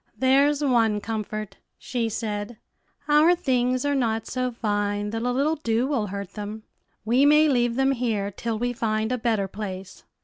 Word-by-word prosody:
"There's 280 Hz, +3 st, +3 dB
one 230 Hz, -6 st, +2 dB
comfort," 215 Hz, -1 st, -5 dB, 0.2 s
she 235 Hz, -3 st, -2 dB
said; 210 Hz, 0 st, -4 dB, 0.5 s
"our 305 Hz, +4 st, +5 dB
things 255 Hz, -5 st, 0 dB
are 285 Hz, -, +1 dB
not 225 Hz, -5 st, 0 dB
so 255 Hz, 0 st, -2 dB
fine 205 Hz, -2 st, -1 dB
that 225 Hz, 0 st, -3 dB
a 245 Hz, +1 st, 0 dB
little 290 Hz, +5 st, +1 dB
dew 230 Hz, -3 st, 0 dB
will 265 Hz, -7 st, -1 dB
hurt 200 Hz, -1 st, -6 dB
them. 210 Hz, +1 st, -7 dB, 0.4 s
We 245 Hz, +5 st, +3 dB
may 300 Hz, +2 st, +6 dB
leave 240 Hz, -4 st, +1 dB
them 270 Hz, +1 st, +2 dB
here 225 Hz, -6 st, -1 dB
till 225 Hz, +3 st, -3 dB
we 245 Hz, +2 st, -1 dB
find 220 Hz, -1 st, -1 dB
a 250 Hz, -, -1 dB
better 220 Hz, -4 st, 0 dB
place." 190 Hz, -2 st, -7 dB
230 Hz, 170 wpm, -25 LUFS, 210-260 Hz, 0.5 s, may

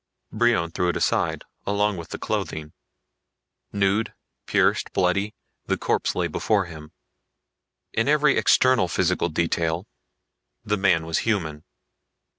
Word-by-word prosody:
Brion 110 Hz, -7 st, +2 dB
threw 90 Hz, +2 st, 0 dB
it 85 Hz, -, 0 dB
aside, -, -, 0 dB, 0.2 s
along 105 Hz, +1 st, +1 dB
with 85 Hz, -2 st, -8 dB
the -, -, -5 dB
clothing. 75 Hz, -1 st, -3 dB, 1.0 s
Nude, 100 Hz, +2 st, 0 dB, 0.3 s
pierced, -, -, +2 dB
bloody, 100 Hz, +4 st, +1 dB, 0.3 s
the -, -, +1 dB
corpse -, -, 0 dB
lay -, -, 0 dB
before 105 Hz, -3 st, 0 dB
him. 80 Hz, -3 st, -11 dB, 1.0 s
In 115 Hz, +2 st, +1 dB
every 150 Hz, 0 st, +4 dB
external 130 Hz, -7 st, +4 dB
physical 90 Hz, 0 st, 0 dB
detail 85 Hz, +2 st, -1 dB, 0.8 s
the 105 Hz, -, +1 dB
man 95 Hz, -5 st, +2 dB
was 80 Hz, 0 st, 0 dB
human. 80 Hz, -9 st, -2 dB
95 Hz, 120 wpm, -24 LUFS, 85-105 Hz, 1.0 s, every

